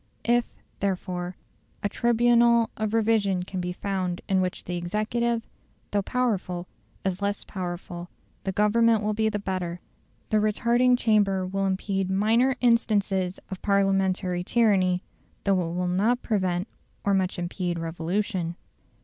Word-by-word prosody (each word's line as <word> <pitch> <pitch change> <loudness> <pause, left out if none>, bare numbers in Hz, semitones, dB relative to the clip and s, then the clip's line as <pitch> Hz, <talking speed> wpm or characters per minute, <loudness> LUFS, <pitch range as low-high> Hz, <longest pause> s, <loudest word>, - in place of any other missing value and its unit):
If, 240 0 +2 0.3
therefore, 180 -2 -2 0.5
a - - +3
tribunal 235 0 +4
of 215 +1 -1
revision 210 -5 +2
can 185 0 -4
be 180 0 -2
found 185 -1 -2
in 190 -1 +2
which 185 -1 -2
the 180 - -4
executive, 225 +6 -1 0.5
though 205 - +2
powerful, 195 -7 -1 0.4
is 190 0 -1
less 200 0 -1
powerful, 175 -1 -6 0.3
the 190 - -1
Government 215 +2 +3
will 210 0 0
be 220 +1 +1
the 210 - -2
better; 185 -3 -3 0.5
the 215 - +4
retarding 235 +4 +3
chamber 205 -5 +2
will 195 +1 -1
impede 190 0 -1
minor 225 +7 +3
instances 200 -6 +2
of 190 - -5
Parliamentary 195 -2 +1
tyranny, 190 -5 +2 0.4
though 200 - +3
it 170 0 -3
will 180 0 0
not 210 +8 +1
prevent 185 -3 0 0.4
or 200 - +2
much 190 -1 +1
impede 175 0 -2
revolution. 170 +2 -2
195 Hz, 135 wpm, -26 LUFS, 180-220 Hz, 0.5 s, tribunal